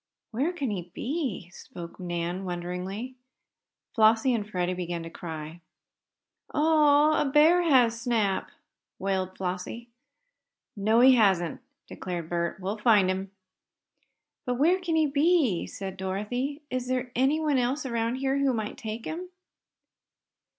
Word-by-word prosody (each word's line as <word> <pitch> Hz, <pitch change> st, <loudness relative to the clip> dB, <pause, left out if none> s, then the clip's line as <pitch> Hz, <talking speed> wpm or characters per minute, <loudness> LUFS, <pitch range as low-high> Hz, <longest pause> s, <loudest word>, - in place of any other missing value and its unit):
"Where 270 Hz, +9 st, 0 dB
can 285 Hz, -10 st, -3 dB
he 180 Hz, -3 st, -5 dB
be?" 255 Hz, -, -3 dB
spoke 170 Hz, -1 st, -10 dB
Nan, 175 Hz, +1 st, -3 dB
wonderingly. 180 Hz, +6 st, -5 dB, 0.8 s
Flossie 225 Hz, +3 st, +4 dB
and 215 Hz, -3 st, -2 dB
Freddie 180 Hz, -2 st, -1 dB
began 175 Hz, -2 st, -4 dB
to 165 Hz, -, -8 dB
cry. 160 Hz, 0 st, -7 dB, 0.9 s
"Oh, 300 Hz, -1 st, +4 dB
a -, -, +1 dB
bear 305 Hz, +5 st, +5 dB
has 245 Hz, -8 st, +3 dB
Snap!" 220 Hz, -6 st, 0 dB, 0.5 s
wailed 190 Hz, -1 st, -2 dB
Flossie. 185 Hz, +6 st, -4 dB, 0.9 s
"No, 220 Hz, +3 st, +3 dB
he 260 Hz, +1 st, +8 dB
hasn't!" 200 Hz, 0 st, +2 dB, 0.2 s
declared 175 Hz, -3 st, -6 dB
Bert. 170 Hz, +1 st, -2 dB
"We'll 195 Hz, +3 st, -4 dB
find 210 Hz, -4 st, +4 dB
him." 190 Hz, +1 st, -4 dB, 1.1 s
"But 250 Hz, -, -1 dB
where 335 Hz, +9 st, +3 dB
can 345 Hz, -3 st, -2 dB
he 315 Hz, -1 st, +4 dB
be?" 290 Hz, -, +2 dB
said 195 Hz, -1 st, -7 dB
Dorothy. 245 Hz, +10 st, -3 dB
"Is 255 Hz, -1 st, -2 dB
there 255 Hz, -1 st, -2 dB
anyone 285 Hz, +2 st, +2 dB
else 260 Hz, +4 st, -1 dB
around 235 Hz, -1 st, -1 dB
here 270 Hz, +1 st, 0 dB
who 275 Hz, -3 st, +2 dB
might 215 Hz, -2 st, -4 dB
take 220 Hz, +1 st, -6 dB
him?" 355 Hz, +3 st, -5 dB
225 Hz, 130 wpm, -27 LUFS, 185-275 Hz, 1.1 s, he